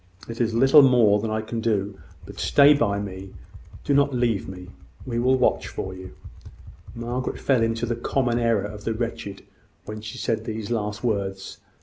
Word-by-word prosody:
It 115 +1 -5
is 115 -1 0
little 120 -5 +5
I 110 0 -1
can 115 +1 -4
do; 100 -3 -1 0.3
but - - -11
stay 145 +1 +6
by 105 -8 0
me: 95 -1 -7 0.5
do 140 - 0
not 140 -1 +3
leave 115 -6 0
me. 90 -1 -10 0.4
I 120 -2 -2
will 130 +2 +3
watch - - +1
for 95 - -5
you." 95 0 -10 0.8
Margaret 120 +2 -3
fell 130 -4 +2
into 115 +1 0
the 120 0 -2
common 120 0 0
error 115 -4 +1
of 105 0 -8
the 115 - -2
wretched, 115 -4 -5 0.4
when 105 +1 -7
she 105 0 -8
said 115 - -2
these 110 0 -5
last 105 0 -3
words. 100 -4 -3
115 Hz, 170 wpm, -24 LUFS, 100-120 Hz, 0.8 s, stay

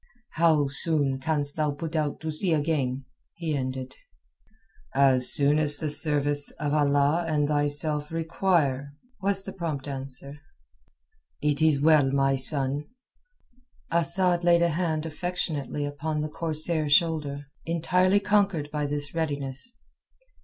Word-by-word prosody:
"How 160 -3 +2
soon 140 -1 0
canst 145 0 +1
thou 155 -1 +1
put 150 +3 -5
to 155 0 -2
sea 165 +3 0
again?" 140 -4 -1 0.3
he 165 -3 -3
ended 130 -1 -5 1.0
"As 130 -2 +4
soon 145 0 +3
as 150 -1 +2
the 155 -1 -2
service 145 -1 0
of 150 -1 -2
Allah 145 +2 +2
and 150 -2 0
thyself 145 0 +2
require," 160 -5 -1 0.3
was 195 0 +2
the 195 - -8
prompt 155 -6 -5
answer. 135 +1 -7 1.0
"It 150 0 -1
is 155 -3 +3
well, 150 -2 +4
my 135 0 +1
son." 140 +1 +2 1.1
Asad 175 +1 +2
laid 170 0 +4
a 170 - +2
hand, 160 -1 -2
affectionately 160 -4 -3
upon 150 +2 -3
the 155 - -3
corsair's 155 -1 +1
shoulder, 150 -3 +1 0.2
entirely 180 +4 +2
conquered 200 -7 0
by 150 -1 -2
this 145 0 -3
readiness. 145 - -4
150 Hz, 125 wpm, -26 LUFS, 140-165 Hz, 1.1 s, As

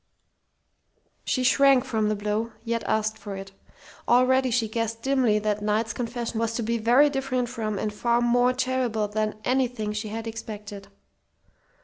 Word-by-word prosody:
She 255 - 0
shrank 270 0 +5
from 220 -5 0
the 215 - 0
blow, 210 +2 -2
yet 230 0 -1
asked 220 0 0
for 205 -2 -7
it. 195 0 -8 0.6
Already 255 +2 +4
she 230 -2 +1
guessed 230 +1 -3
dimly 260 -6 +2
that 210 0 -1
Knight's 215 +2 0
confession 235 -1 -3
was 230 0 -1
to 235 - -1
be 230 +1 -1
very 245 +6 +5
different 265 -3 -1
from 220 -4 -3
and 210 +1 -2
far 235 +2 +1
more 245 +1 +3
terrible 255 -4 -1
than 215 +1 -2
anything 245 -5 0
she 215 +1 -4
had 225 +2 -5
expected. 210 -3 -7
230 Hz, 155 wpm, -25 LUFS, 215-250 Hz, 0.6 s, shrank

